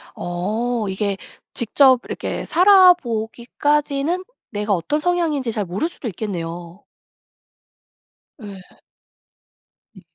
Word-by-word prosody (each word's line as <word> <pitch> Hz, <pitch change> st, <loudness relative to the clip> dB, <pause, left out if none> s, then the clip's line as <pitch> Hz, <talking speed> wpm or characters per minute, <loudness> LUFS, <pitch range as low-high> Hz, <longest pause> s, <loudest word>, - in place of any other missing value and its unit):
어 215 Hz, +6 st, -2 dB
이게 195 Hz, +1 st, -2 dB, 0.4 s
직접 255 Hz, +2 st, +4 dB
이렇게 -, -, -4 dB
살아 370 Hz, 0 st, +7 dB
보기까지는 280 Hz, +5 st, -2 dB, 0.3 s
내가 210 Hz, -1 st, -1 dB
어떤 195 Hz, -, -1 dB
성향인지 315 Hz, -7 st, 0 dB
잘 210 Hz, -2 st, -2 dB
모를 185 Hz, -, -2 dB
수도 300 Hz, -, -8 dB
있겠네요. 175 Hz, -3 st, -6 dB, 1.6 s
예. 195 Hz, -3 st, -12 dB, 1.2 s
네. 190 Hz, -, -14 dB
230 Hz, 200 characters per minute, -21 LUFS, 195-295 Hz, 1.6 s, 살아